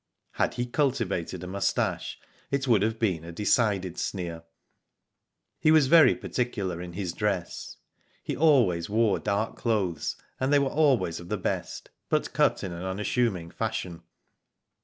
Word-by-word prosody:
Had - - -1
he 120 - -1
cultivated 115 - -1
a - - -6
moustache, 100 +2 -1 0.3
it 140 0 -1
would 115 -5 +4
have 110 +2 0
been 95 -8 0
a 85 - -8
decided 95 -1 +1
sneer. 85 -4 -4 1.2
He 155 - +3
was 155 -2 +6
very 160 +2 +6
particular 100 -8 -3
in 90 -1 -7
his 90 -2 -3
dress. 100 -3 -3 0.5
He - - -3
always 120 - +3
wore 110 -1 +2
dark 105 +2 -1
clothes, 100 -9 -1 0.2
and 130 +2 0
they 145 - +6
were 140 -1 +2
always 135 - +2
of 85 0 -11
the - - -1
best, - - -4 0.2
but - - 0
cut - - +2
in 95 - -4
an 85 0 -6
' 95 0 -3
unassuming 95 -3 -1
fashion. 100 -7 -4
105 Hz, 155 wpm, -27 LUFS, 90-125 Hz, 1.2 s, was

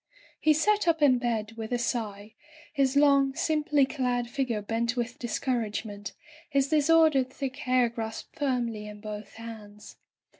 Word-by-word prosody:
He 310 - +4
sat 415 +6 +2
up 330 -1 +3
in 255 -4 +5
bed 230 -3 -1
with 225 0 -7
a 245 - +1
sigh, 215 -3 -3 0.4
his 275 -2 +1
long, 280 -2 +4
sim 310 -1 0
ply 295 -2 +3
clad 250 -3 -1
figure 240 -4 -2
bent 230 +3 -1
with 240 0 -3
discouragement, 220 -4 -3 0.4
his 275 -2 +1
disordered 310 -3 +4
thick 265 0 -5
hair 255 -3 +2
grasped 225 -1 -6
firmly 240 -6 -1
in 210 0 -9
both 210 -1 -7
hands. 215 -2 -10
245 Hz, 150 wpm, -28 LUFS, 220-275 Hz, 0.4 s, in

